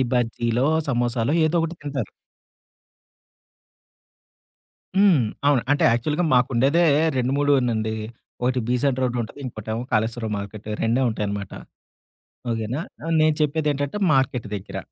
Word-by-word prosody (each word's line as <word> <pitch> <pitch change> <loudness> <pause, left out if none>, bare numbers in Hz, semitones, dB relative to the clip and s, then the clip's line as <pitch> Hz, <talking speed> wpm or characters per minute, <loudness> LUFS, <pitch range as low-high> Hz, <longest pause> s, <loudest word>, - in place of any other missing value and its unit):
ఈ - - +5
బజ్జీలో, 120 0 0 0.2
సమోసాలో 120 0 0
ఏదో 155 +2 +1
ఒకటి 165 +1 -2
తింతారు. 140 -7 -4 2.9
హ్మ్. 195 -7 +5 0.3
అవును. 140 -5 +3
అంటే 145 - +2
యాక్చువల్‌గా 150 +9 0
మాకు 125 +1 +4
ఉండేదే 135 +8 +3 0.4
2 125 +1 0
మూడేనండి. 125 -6 +1 0.5
1 125 +1 +1
'బీసెంట్ 125 +1 +1
రోడ్‌' 125 -1 0
ఉంటది. 115 - -10
ఇంకోటేమో 110 -1 -4
'కాళేశ్వరం 110 +1 0
మార్కెట్' 100 +1 -8 0.2
రెండే 115 +4 +2
ఉంటాయనమాట. 100 -2 -4 1.0
ఓకేనా? 115 +5 -2 0.4
నేను 155 -1 +4
చెప్పేదేంటంటే 150 +1 0
మార్కెట్ 130 -4 +1
దెగ్గర. 100 -2 -6
125 Hz, 115 wpm, -23 LUFS, 115-145 Hz, 2.9 s, ఈ